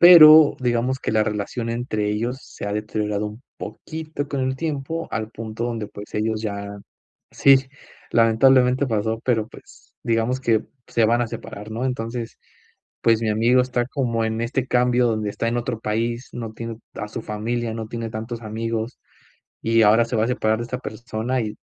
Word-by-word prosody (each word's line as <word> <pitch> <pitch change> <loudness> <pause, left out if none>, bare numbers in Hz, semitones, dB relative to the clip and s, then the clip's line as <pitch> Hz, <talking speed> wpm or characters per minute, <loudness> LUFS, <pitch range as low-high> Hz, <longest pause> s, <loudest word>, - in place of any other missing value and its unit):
Pero, 160 -3 +10
digamos 125 +1 0
que - - -3
la 110 -1 +4
relación 110 +3 -3
entre 110 -3 -1
ellos 120 +5 -2
se - - -8
ha 100 - -2
deteriorado 105 0 -2
un 105 +5 -9
poquito 155 -2 -6
con 140 -2 -2
el 130 0 0
tiempo 160 +2 -3
al 110 -1 -3
punto 115 0 -5
donde 115 -3 -3
pues 105 0 -11
ellos 110 0 0
ya 100 -1 -4 0.5
sí, 135 -1 +5 0.4
lamentablemente 125 +3 +4
pasó, 110 0 -1
pero, 115 -4 +1
pues, - - -17
digamos 115 +2 0
que 115 -4 +2 0.2
se 115 - +2
van 120 +2 +3
a - - -1
separar, 105 0 -8
¿no? 115 +4 -3
Entonces, 120 -2 -3 0.6
pues, 115 -1 +4
mi 110 - 0
amigo 120 +4 +4
está 125 -1 -1
como 120 -5 -1
en 110 0 -1
este 130 +2 -1
cambio 125 0 +3
donde 110 -2 -1
está 115 - -2
en 120 - -1
otro 115 -1 -3
país, 115 +3 -2
no 115 -2 -5
tiene 115 0 -6 0.2
a 105 - -5
su 115 +1 -6
familia, 115 +2 -2
no 110 -1 -4
tiene 115 -1 -4
tantos 115 +2 -5
amigos 115 +2 -3 0.6
y 115 0 +3
ahora 110 +3 +5
se 120 - -3
va 110 - +3
a - - -2
separar 110 -3 +1
de 120 - -2
esta 125 +2 -4
persona 120 +1 -3
y 105 -1 -4
115 Hz, 185 wpm, -23 LUFS, 110-125 Hz, 0.6 s, Pero